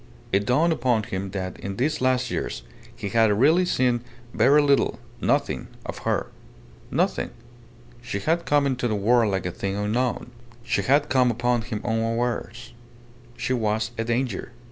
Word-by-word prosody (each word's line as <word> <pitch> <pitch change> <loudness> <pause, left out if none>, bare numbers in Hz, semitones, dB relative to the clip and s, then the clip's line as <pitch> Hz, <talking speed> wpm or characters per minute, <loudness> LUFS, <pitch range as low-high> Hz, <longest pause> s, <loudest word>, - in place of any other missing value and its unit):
It 100 +1 +1
dawned 160 +7 +3
upon 120 -5 +1
him 95 -1 -4
that 95 -1 -5
in 95 0 -5
these 135 +7 0
last 130 -1 +1
years - - -3 0.3
he 100 - -5
had 110 +1 +4
really 150 - +4
seen 125 -7 +1 0.3
very 135 +7 +5
little 140 -1 +3 0.2
nothing - - 0 0.2
of - - -6
her. - - 0 0.6
Nothing. - - 0 0.7
She 120 -3 -4
had 165 - 0
come 145 -1 +3
into 130 -3 0
the 110 - 0
world 110 +1 +3
like 95 -2 -1
a 90 - -1
thing 95 +2 -3
unknown. 120 +5 -1 0.3
She 120 +1 0
had 145 +3 +3
come 130 -3 +3
upon 120 +1 +1
him 110 -1 -5
unawares. 115 +1 -2 0.6
She 130 - -1
was 110 -1 0
a 115 - -2
danger. 120 -1 -2
120 Hz, 160 wpm, -24 LUFS, 105-130 Hz, 0.7 s, very